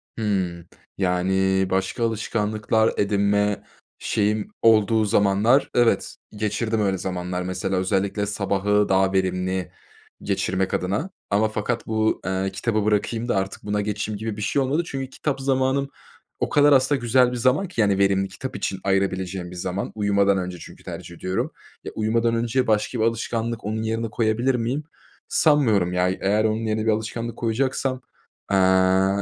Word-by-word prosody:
Hımm. 95 -6 -2 0.3
Yani, 95 +1 +1
başka 95 +5 -1
alışkanlıklar 110 0 0
edinme 100 0 +1 0.4
şeyim 105 0 0
olduğu 110 0 +4
zamanlar, 105 +6 +3
evet, 120 -1 +2 0.2
geçirdim 110 +1 -1
öyle 95 -2 +1
zamanlar. 90 0 -3
Mesela, 95 +1 -2
özellikle 95 +2 0
sabahı 100 0 0
daha 95 0 +3
verimli 95 -1 -1 0.5
geçirmek 95 0 -1
adına 100 - -1 0.2
ama 105 +2 +2
fakat 110 +2 -3
bu, 110 0 0
eee, 95 +1 -1
kitabı 105 +2 -1
bırakayım 110 +2 0
da 120 - +1
artık 95 0 -3
buna 105 0 -1
geçeyim 105 0 -3
gibi 110 0 -4
bir - - -5
şey 135 +6 +1
olmadı. 145 +6 +1
Çünkü 135 -3 -5
kitap 140 0 -3
zamanım 135 +1 +1 0.5
o - - -1
kadar 145 0 +5
aslında 135 +1 +3
güzel 125 +1 +3
bir 125 - -3
zaman 130 +10 +2
ki, 175 -10 -1
yani, 100 -2 +3
verimli, 95 0 +2
kitap 130 +7 -7
için 95 - -3
ayırabileceğim 95 -2 -1
bir - - -9
zaman. 90 +2 -3
Uyumadan 100 -1 +2
önce 90 -1 -4
çünkü - - -12
tercih 85 - -8
ediyorum. 95 +2 -2 0.3
Ya, - - -6
uyumadan 115 +2 +1
önce 120 +2 0
başka 110 +2 0
bir - - +2
alışkanlık 115 0 -2
onun 110 +1 -2
yerine 115 0 -2
koyabilir 115 +4 +1
miyim? 125 +5 -1 0.4
Sanmıyorum, 110 - +3
ya. 90 0 +2
Eğer 100 +3 +1
onun 110 +1 0
yerine 110 0 -1
bir 110 - +3
alışkanlık 115 +2 -3
koyacaksam, 130 +2 -1 0.5
eee, 95 0 +4
105 Hz, 150 wpm, -23 LUFS, 95-115 Hz, 0.5 s, kadar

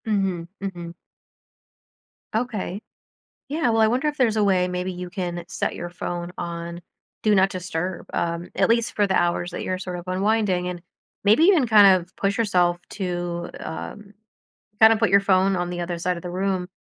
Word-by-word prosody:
Mhm, 195 -6 -1
mhm. 175 -4 -6 1.4
Okay. 215 -4 -2 0.7
Yeah, 300 -3 +1
well, 225 -1 +3
I 220 - +6
wonder 255 +7 +1
if 295 0 -2
there's 230 -4 +2
a 215 - +3
way 185 -2 +3
maybe 180 +1 -3
you 180 0 -6
can 175 -2 -4
set - - -2
your 175 - -5
phone 175 0 -5
on 170 0 -5 0.4
Do 215 -1 +3
Not 190 0 +4
Disturb, 180 -1 -4
um, 170 +1 -2
at - - +2
least 230 0 +1
for 205 - +3
the 190 - 0
hours 175 0 +1
that - - -5
you're 185 - -2
sort 180 -1 -5
of 175 - -12
unwinding 190 -1 +1
and 175 -1 -6 0.4
maybe 215 +10 +5
even 340 -8 +5
kind 200 -4 +7
of 180 +2 -17
push 200 0 -1
yourself 180 -6 +2
to, 175 -3 -3
um, 205 +5 -7 0.7
kinda 220 0 +8
put 220 -3 +1
your 200 +1 +6
phone 195 0 +3
on 175 -1 -2
the 175 0 -4
other 175 0 -3
side 180 +1 -1
of 170 - -8
the 180 - -5
room. 185 0 -1
185 Hz, 185 wpm, -23 LUFS, 175-210 Hz, 1.4 s, kinda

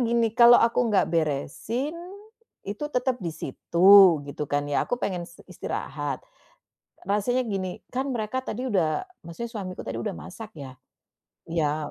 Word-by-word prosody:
gini, 235 -1 +2
kalau 240 +1 +8
aku 230 0 +2
nggak 205 -3 +2
beresin, 165 - -1 0.7
itu 205 +9 -5
tetap 250 0 0
di 170 - -2
situ 170 +3 +5
gitu 145 +1 -6
kan 145 0 +1
ya, - - +1
aku 245 - -2
pengen 180 -3 -2
s 170 - -17
istirahat. - - -4 0.9
Rasanya 245 +5 +1
gini, 190 -2 -2 0.2
kan 265 +1 -2
mereka 225 +3 -2
tadi 255 +3 -4
udah 170 - +1 0.2
maksudnya 170 +8 -6
suamiku 190 -4 -6
tadi 115 0 -5
udah - - -3
masak 210 +3 -9
ya, 130 -3 -9 0.7
iya 155 -2 -1
195 Hz, 145 wpm, -26 LUFS, 160-235 Hz, 0.9 s, kalau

